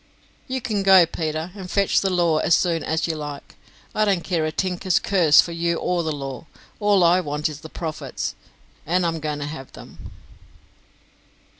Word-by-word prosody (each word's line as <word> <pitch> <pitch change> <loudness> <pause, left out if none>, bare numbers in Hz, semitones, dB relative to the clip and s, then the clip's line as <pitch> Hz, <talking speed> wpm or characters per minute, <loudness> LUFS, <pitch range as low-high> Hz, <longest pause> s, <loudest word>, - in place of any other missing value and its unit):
"You 260 0 -3
can 215 -4 -1
go, 190 -2 +7
Peter, 160 +1 -4
and 190 -3 -9
fetch 200 0 +2
the 195 - +1
law 170 -4 +2
as 170 - +3
soon 170 -3 0
as 160 +1 -1
you 165 - -2
like. 145 -2 -7 0.4
I 215 - +2
don't 195 -5 +1
care 170 -4 -1
a - - -2
tinker's 185 +1 0
curse 175 -7 +5
for 170 - -6
you 170 0 -1
or 180 -1 0
the 160 -1 -2
law; 135 +1 -6 0.3
all 205 -3 +3
I 175 +2 +5
want 150 -3 -2
is 150 -2 -7
the 160 - -11
profits, 160 -1 -5 0.5
and 180 +3 +1
I'm 165 -1 -1
going 150 -1 -3
to 145 - -4
have 145 -3 -8
them." - - -12
170 Hz, 185 wpm, -22 LUFS, 155-185 Hz, 0.5 s, go